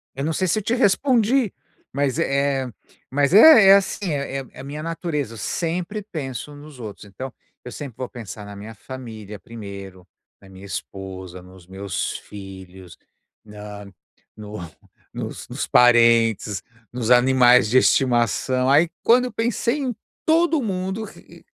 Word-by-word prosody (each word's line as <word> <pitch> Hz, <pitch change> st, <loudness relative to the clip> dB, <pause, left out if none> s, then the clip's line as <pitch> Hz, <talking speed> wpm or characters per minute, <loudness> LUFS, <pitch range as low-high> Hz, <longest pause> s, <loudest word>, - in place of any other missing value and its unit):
Eu 135 Hz, -, -4 dB
não 160 Hz, -, 0 dB
sei 185 Hz, +4 st, 0 dB
se 215 Hz, +5 st, +1 dB
te 225 Hz, -, -1 dB
respondi, 240 Hz, 0 st, +2 dB, 0.4 s
mas 140 Hz, 0 st, 0 dB
é 140 Hz, -3 st, +1 dB
é -, -, -6 dB, 0.4 s
mas 145 Hz, +4 st, +1 dB
é 220 Hz, -3 st, +9 dB
é 195 Hz, -, +10 dB
assim 195 Hz, -2 st, 0 dB
é 140 Hz, -1 st, -3 dB
é -, -, -6 dB
é -, -, -13 dB
a -, -, -10 dB
minha 145 Hz, +2 st, -6 dB
natureza. 160 Hz, -, -3 dB
Eu -, -, -10 dB
sempre 175 Hz, -, -3 dB
penso 150 Hz, -, -6 dB
nos 145 Hz, -2 st, -13 dB
outros. 105 Hz, -3 st, -8 dB
Então, 125 Hz, +7 st, -8 dB, 0.3 s
eu 125 Hz, -, -7 dB
sempre 135 Hz, -6 st, -8 dB
vou 130 Hz, -, -4 dB
pensar 110 Hz, -3 st, -9 dB
na 100 Hz, 0 st, -9 dB
minha 105 Hz, +3 st, -9 dB
família 110 Hz, -3 st, -9 dB
primeiro, 100 Hz, -5 st, -10 dB, 0.3 s
na 100 Hz, -, -16 dB
minha 95 Hz, +1 st, -12 dB
esposa, 95 Hz, -2 st, -7 dB
nos 90 Hz, -1 st, -16 dB
meus 95 Hz, +1 st, -4 dB
filhos, 95 Hz, -3 st, -11 dB, 0.5 s
na 105 Hz, -1 st, -10 dB, 0.5 s
no 105 Hz, -1 st, -8 dB, 0.5 s
nos -, -, -6 dB
nos -, -, -4 dB
parentes, 115 Hz, -4 st, +4 dB, 0.3 s
nos 125 Hz, -1 st, -2 dB
animais 125 Hz, -2 st, +5 dB
de 130 Hz, -, +4 dB
estimação. 125 Hz, 0 st, +2 dB
Aí, 155 Hz, +4 st, +5 dB
quando 250 Hz, +2 st, +5 dB
eu 245 Hz, -, -6 dB
pensei 235 Hz, +4 st, 0 dB
em 260 Hz, -4 st, -2 dB, 0.3 s
todo 325 Hz, -2 st, +3 dB
mundo, 190 Hz, +1 st, -3 dB
r -, -, -14 dB
r -, -, -17 dB
130 Hz, 160 wpm, -22 LUFS, -, 0.5 s, é